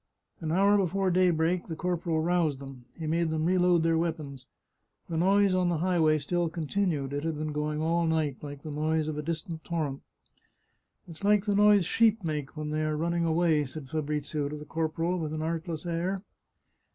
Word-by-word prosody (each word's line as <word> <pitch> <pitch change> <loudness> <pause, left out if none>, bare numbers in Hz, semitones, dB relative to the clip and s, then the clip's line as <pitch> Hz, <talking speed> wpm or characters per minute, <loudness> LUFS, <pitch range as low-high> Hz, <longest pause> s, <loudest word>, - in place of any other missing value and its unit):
An 160 -1 -3
hour 200 +4 +4
before 190 0 +1
daybreak 175 -1 +2
the 160 - -4
corporal 170 -2 -1
roused 165 -5 +1
them; 135 -3 -10
he 165 - -5
made 165 +1 +1
them 155 0 -1
reload 180 -1 +3
their 165 0 +2
weapons. 150 -6 -4 0.6
The 165 - -4
noise 195 +3 +4
on 180 -1 +2
the 170 - 0
highway 160 -2 +3
still 170 +3 -1
continued; 160 -3 -1
it 145 +1 -2
had 165 -1 -1
been 155 0 -3
going 150 +1 -2
on - - 0
all 170 +1 +1
night, 155 -4 0
like 145 -1 -8
the 155 - -6
noise 155 +1 0
of 150 -1 -3
a - - -1
distant 160 +1 -4
torrent. 155 -5 -3 0.5
" - - -46
It's 165 +2 -11
like 205 0 +3
the 205 - +1
noise 205 -2 +5
sheep 225 0 +3
make 150 -2 -4
when 150 0 -3
they 155 0 -1
are 155 0 -1
running 170 +1 0
away," 160 -2 +2
said 135 0 -8
Fabrizio 150 -1 -2
to 150 - -5
the 150 - -9
corporal, 165 +3 -1
with 155 -2 -3
an 155 - -3
artless 165 0 -3
air. 175 +3 -2
160 Hz, 200 wpm, -28 LUFS, 150-175 Hz, 0.6 s, noise